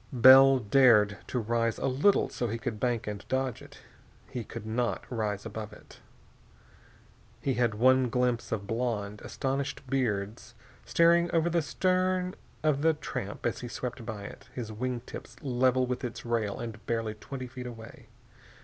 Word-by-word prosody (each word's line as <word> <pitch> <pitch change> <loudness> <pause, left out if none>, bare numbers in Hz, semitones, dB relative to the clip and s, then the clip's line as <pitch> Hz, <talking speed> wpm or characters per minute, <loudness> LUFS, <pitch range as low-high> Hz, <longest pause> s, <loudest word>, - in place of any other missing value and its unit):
Bell 135 +2 +8
dared 105 -3 +4
to - - -3
rise 115 0 0
a - - -3
little 140 +10 +3
so 120 - -3
he 115 +1 -3
could 115 -2 -4
bank 120 -2 0
and 105 -1 -5
dodge 130 -2 -1
it. - - -14 0.5
He 125 - -4
could 105 - -8
not 115 -2 -1
rise 105 -4 -2
above 110 -1 -6
it. 105 - -15 1.4
He 135 - 0
had 120 -3 +1
one 130 +2 +4
glimpse 125 0 0
of 100 -3 -2
blonde, 110 -3 -2
astonished 135 +1 -3
beards 110 -3 -2 0.3
staring 170 +1 +4
over 165 +1 +2
the 170 0 +2
stern 185 +2 0 0.3
of 150 -3 +2
the 160 0 +3
tramp 100 -8 -5
as 120 - 0
he 125 - -6
swept 120 0 -5
by 110 -3 -6
it, - - -10
his 115 -4 -5
wing 125 +2 -3
tips 120 0 -10
level 130 -1 +2
with 125 +1 -3
its 120 -1 -5
rail 115 -4 -1
and 115 -2 -7
barely 115 -2 -1
twenty 130 +4 -7
feet 125 0 -7
away. 115 -2 -11
120 Hz, 165 wpm, -29 LUFS, 110-130 Hz, 1.4 s, Bell